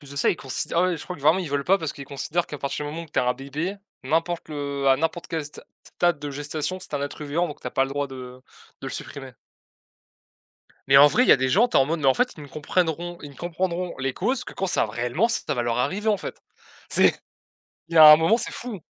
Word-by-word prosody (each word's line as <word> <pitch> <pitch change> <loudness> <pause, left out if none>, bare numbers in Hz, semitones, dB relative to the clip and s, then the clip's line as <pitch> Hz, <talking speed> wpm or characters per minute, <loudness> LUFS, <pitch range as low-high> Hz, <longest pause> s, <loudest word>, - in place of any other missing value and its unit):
plus 145 -2 -14
de 140 - -10
ça, 140 - +2
ils - - +2
considérent 135 +5 -3
ah, - - +3
ouais, 175 - -1
je - - -8
crois 180 - -6
que 140 - -15
vraiment 155 +5 +4
ils 180 -5 -4
veulent 140 0 -1
pas 195 +5 +3
parce 160 -4 -4
qu'ils 140 - -9
considèrent 160 +6 -2
qu'à 150 - -7
partir 140 +2 -3
du 145 - -4
moment 165 +2 -6
où - - -15
que 150 - -29
tu - - 0
as 125 - +2
un 125 - +3
bébé, 145 +9 -5 0.3
n'importe 165 +4 -1
le 140 -2 -3
à 135 - +5
n'importe 165 +2 -2
quel 160 -2 -3
sta 150 - -11 0.2
stade 175 -4 0
de 145 0 -6
gestation 145 +5 -4
c'est 180 - -10
un 145 - -1
être 145 +1 -5
vivant 165 +4 -1
donc 150 - -9
tu - - -7
as 125 - -3
pas 135 - +2
le - - -6
droit 145 0 -2
de 130 -1 -10 0.4
de - - -5
le - - -4
supprimer. - - -8 1.6
Mais 135 - +6
en 145 +1 +9
vrai 250 - +3
il - - -2
y - - +10
a - - +6
des 130 0 0
gens, 210 - +4
tu - - 0
es - - +6
en - - +4
mode 165 +3 -2
mais 140 - 0
en 130 - +5
fait 250 - +1
ils 150 - -10
ne - - -9
comprendront 170 +3 -2
ils 145 - -8
ne - - -16
comprendront 175 +2 -3
les 130 0 -1
causes 245 +6 -1
que - - -9
quand 190 -1 -2
ça 145 - +2
réellement 120 - 0
ça 235 - -2
va 120 - -1
leur 120 0 -1
arriver 205 - -1
en 210 - +3
fait. - - -8 0.5
C'est - - +4 0.8
il 165 - -5
y - - +5
a 155 - +11
un 150 - +9
moment, 185 +9 +3
c'est 240 - -1
fou! 235 -6 -6
150 Hz, 290 wpm, -24 LUFS, 140-175 Hz, 1.6 s, a